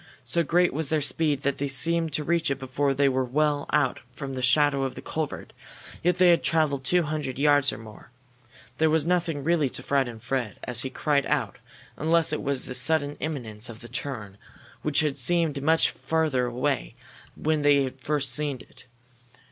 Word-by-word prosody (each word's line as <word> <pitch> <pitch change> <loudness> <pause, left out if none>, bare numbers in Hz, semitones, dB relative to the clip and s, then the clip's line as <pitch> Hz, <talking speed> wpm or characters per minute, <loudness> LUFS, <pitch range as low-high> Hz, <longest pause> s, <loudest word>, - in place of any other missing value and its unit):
So 130 +7 +3
great 175 +3 +2
was 155 0 0
their 155 - +2
speed 145 -1 0
that 140 -1 -1
they 140 - -1
seemed 165 +4 0
to 150 - 0
reach 170 +1 0
it 140 - -1
before 135 +1 -1
they 140 +1 +3
were 130 -1 +1
well 145 +3 0
out 130 -4 +1 0.2
from 140 -2 -6
the 130 - -4
shadow 140 +2 +3
of 135 - -3
the - - -8
culvert, 155 -2 -4 0.5
yet 175 +1 +1
they 180 -1 +5
had 170 - +3
traveled 150 -4 +1
two 175 +5 +2
hundred 150 -4 -4
yards 145 0 +3
or - - -7
more. 110 0 -13 0.7
There 160 0 +4
was 155 -1 +1
nothing 170 -4 0
really 160 -3 +2
to - - -8
frighten 130 -5 0
Fred 120 -3 -3
as 120 -1 0
he 130 - -2
cried 140 0 0
out 135 -9 -1 0.4
unless 160 0 +2
it 150 - -2
was 140 -2 -1
the - - -6
sudden 145 +1 +2
imminence 120 -7 -4
of 115 -1 -10
the 120 - -10
turn, 105 -8 -6 0.4
which 150 0 +1
had 145 -3 -2
seemed 155 +1 +1
much 160 +3 +3
further 155 -6 0
away 120 - -2 0.4
when 155 -1 0
they 145 -1 +4
had 130 0 -6
first 140 -1 -1
seen 145 0 0
it. - - -16
145 Hz, 195 wpm, -26 LUFS, 130-155 Hz, 0.7 s, they